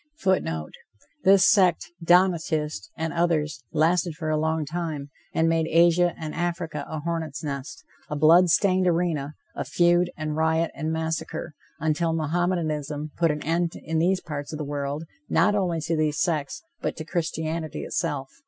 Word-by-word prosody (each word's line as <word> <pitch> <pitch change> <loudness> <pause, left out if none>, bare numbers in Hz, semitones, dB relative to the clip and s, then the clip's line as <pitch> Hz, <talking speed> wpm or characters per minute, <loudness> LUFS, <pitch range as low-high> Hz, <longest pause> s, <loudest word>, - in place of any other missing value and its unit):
[Footnote: 80 - 0 0.5
This 190 -1 +6
sect 185 -5 +3
(Donatist) 160 - +2
and 160 -1 -2
others, 155 -5 0
lasted 165 +1 +2
for 155 -1 -3
a 155 - +1
long 160 0 0
time, 155 -3 -4 0.2
and 160 - +2
made 165 -1 +2
Asia 170 +1 +4
and 155 -1 -5
Africa 170 -4 -3
a 155 -1 -4
hornet's 160 -3 -3
nest, 140 -2 -5 0.3
a 150 - -2
blood 165 +4 +6
stained 185 +1 +3
arena, 165 -4 0 0.2
of - - -4
feud 175 0 +3
and 155 -2 -3
riot 160 +1 +1
and 155 0 -3
massacre, 160 0 -3 0.3
until 160 +1 0
Mohammedanism 155 -2 -1
put 170 -1 +2
an 150 0 -2
end, 170 +1 0
in 160 0 -2
these 185 +3 +2
parts 145 -2 -6
of 155 - -4
the 150 - -4
world, 145 +1 -3 0.3
not 210 - +3
only 180 -5 0
to 165 +2 -1
these 155 0 0
sects, 155 - -1 0.2
but - - -2
to 155 - -6
Christianity 160 -1 -3
itself. 145 -6 -2
160 Hz, 160 wpm, -25 LUFS, 150-175 Hz, 0.5 s, This